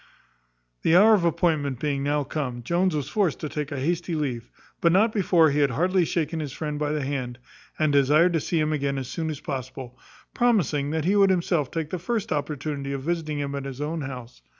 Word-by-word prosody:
The 165 - +3
hour 215 +4 +7
of 200 -5 +3
appointment 150 -6 0
being 140 -1 -1
now 145 +1 0
come, 130 -4 -4
Jones 175 +4 +1
was 145 -3 -2
forced 185 -2 0
to 155 - -2
take 150 -1 -4
a 140 - -3
hasty 170 +4 -1
leave, 125 -6 -3 0.3
but 170 - +4
not 215 +5 +3
before 175 -6 +4
he 145 - 0
had 140 -1 +3
heartily 180 +7 +1
shaken 160 0 -2
his 150 -3 -4
friend 150 +1 -4
by 150 -1 -1
the 150 -2 -1
hand, 130 -3 -3 0.4
and 155 -2 +1
desired 150 +5 +4
to 165 - +2
see 165 +2 -1
him 155 0 +1
again 140 -2 -1
as 130 -2 -4
soon 160 -2 -3
as 150 -3 -4
possible; 130 -2 -6 0.3
promising 175 - +1
that 160 0 -1
he 195 +3 +2
would 200 -1 +5
himself 170 -6 +1
take 160 -2 -4
the 185 - -3
first 215 +4 -2
opportunity 145 -1 -3
of 135 -1 -4
visiting 160 -2 -2
him 140 -1 -3
at 140 -1 -4
his 135 -1 -7
own 155 +2 -3
house. 125 -3 -8
150 Hz, 220 wpm, -25 LUFS, 140-170 Hz, 0.4 s, hour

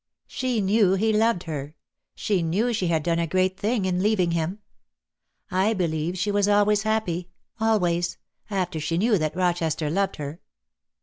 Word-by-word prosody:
She 250 -4 -1
knew 200 -1 +3
he 220 +3 +1
loved 220 -4 +2
her. 150 -2 -6 0.4
She 200 -4 0
knew 200 +9 0
she 195 -5 0
had 160 -2 +1
done 170 0 +1
a 170 - 0
great 185 +2 +1
thing 210 +1 -1
in 180 -1 0
leaving 195 -4 +2
him. 170 +3 -1 0.9
I 195 +5 +2
believe 170 -1 -1
she 200 +3 0
was 205 0 +2
always 205 0 +3
happy 200 -5 -1
— - - -43
always 175 -6 +1 0.2
— - - -56
after 185 -5 -2
she 155 +2 -1
knew 210 +1 +3
that 155 0 -2
Rochester 170 -4 0
loved 195 +3 0
her." 150 +3 -7
185 Hz, 175 wpm, -25 LUFS, 170-210 Hz, 0.9 s, knew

